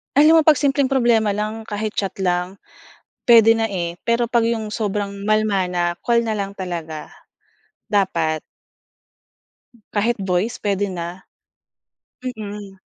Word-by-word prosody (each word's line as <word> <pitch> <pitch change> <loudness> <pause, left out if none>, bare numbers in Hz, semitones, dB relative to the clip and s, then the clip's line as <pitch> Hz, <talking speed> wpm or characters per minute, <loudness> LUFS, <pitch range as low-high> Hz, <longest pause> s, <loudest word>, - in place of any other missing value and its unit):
Alam 310 +3 +7
mo - - +7
'pag 310 - +8
simpleng 280 0 +1
problema 235 -6 +2
lang 215 +2 -4
kahit 215 0 -3
chat 195 -2 -1
lang, 180 +1 0 0.7
puwede 225 -2 +7
na, 225 - 0
eh. 175 -5 -3
Pero 235 0 +1
'pag 235 -1 +2
'yong 225 -2 -1
sobrang 205 -2 -3
malala 215 -2 +2
na 175 -1 0
call 235 -1 +3
na 225 -2 -2
lang 200 -1 -3
talaga, 170 -5 -6 0.8
dapat 170 -7 0 1.5
Kahit 225 +3 +1
voice 180 +6 0
puwede 200 -1 0
na. 175 +1 -6 1.0
Mm. 205 -5 -7
210 Hz, 130 wpm, -21 LUFS, 190-230 Hz, 1.5 s, pag